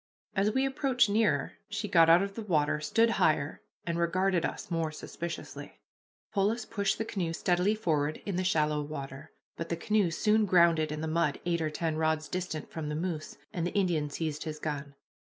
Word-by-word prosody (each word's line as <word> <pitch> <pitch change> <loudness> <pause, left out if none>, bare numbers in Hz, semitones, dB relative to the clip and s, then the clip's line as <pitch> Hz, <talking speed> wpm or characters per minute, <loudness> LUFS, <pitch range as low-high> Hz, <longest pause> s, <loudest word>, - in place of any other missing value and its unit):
As 200 +1 +2
we 265 +4 +1
approached 265 -4 +2
nearer 220 +1 +1
she - - -3
got 165 -2 +5
out 170 +3 +7
of 200 0 -4
the 225 - -5
water, 150 -7 +1
stood 230 +9 +2
higher, 150 -1 +2 0.2
and 170 0 -1
regarded 180 +1 +1
us - - -4
more 165 -2 0
suspiciously. 170 +2 -7 0.6
Polis 215 +4 +1
pushed 200 -3 0
the 225 - -2
canoe 180 -7 -2
steadily 180 +5 +2
forward 155 -7 0
in 200 - -2
the 185 - 0
shallow 150 -4 +1
water, 135 -2 -7 0.3
but 165 - -5
the 170 - -1
canoe 210 +1 +2
soon 210 +6 +2
grounded 170 -4 +4
in 150 0 -4
the 160 - -2
mud 160 -2 +1
eight 170 -1 0
or 155 - 0
ten 160 0 -2
rods 155 -1 0
distant 175 -4 -4
from 155 -2 -4
the 150 - -2
moose, 160 -1 -4 0.2
and 170 -1 -1
the - - -5
Indian 170 -7 +1
seized 155 0 -3
his 155 -1 -5
gun. 145 -2 -5
170 Hz, 190 wpm, -30 LUFS, 155-195 Hz, 0.6 s, out